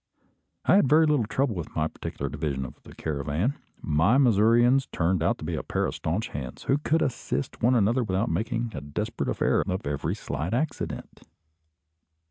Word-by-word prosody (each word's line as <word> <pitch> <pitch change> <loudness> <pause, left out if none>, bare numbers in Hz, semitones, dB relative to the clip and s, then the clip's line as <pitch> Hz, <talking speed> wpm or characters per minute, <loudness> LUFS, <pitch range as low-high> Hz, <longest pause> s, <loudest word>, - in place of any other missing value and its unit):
I - - +6
had 140 - +4
very 160 +2 +6
little 145 -8 +2
trouble 130 0 0
with 85 -5 -6
my 80 0 +1
particular 70 - -5
division 70 -2 -3
of 65 - -11
the - - -14
caravan. 80 - -2 0.2
My 80 - +3
Missourians 120 +1 +4
turned 85 +1 0
out 85 - +2
to - - -10
be 85 +2 -3
a 80 - -1
pair - - -1
of - - -2
staunch 90 +8 -2
hands, 65 -3 -6
who 135 - +2
could 160 +2 +1
assist 70 - -3
one 125 +3 +4
another 120 +3 +3
without 95 +1 0
making 115 +6 -1
a 75 - -5
desperate 70 0 -3
affair - - +2
of 95 +2 -3
every 70 -1 -2
slight 75 +10 -3
accident. 155 +5 -3
95 Hz, 180 wpm, -26 LUFS, 75-125 Hz, 0.2 s, I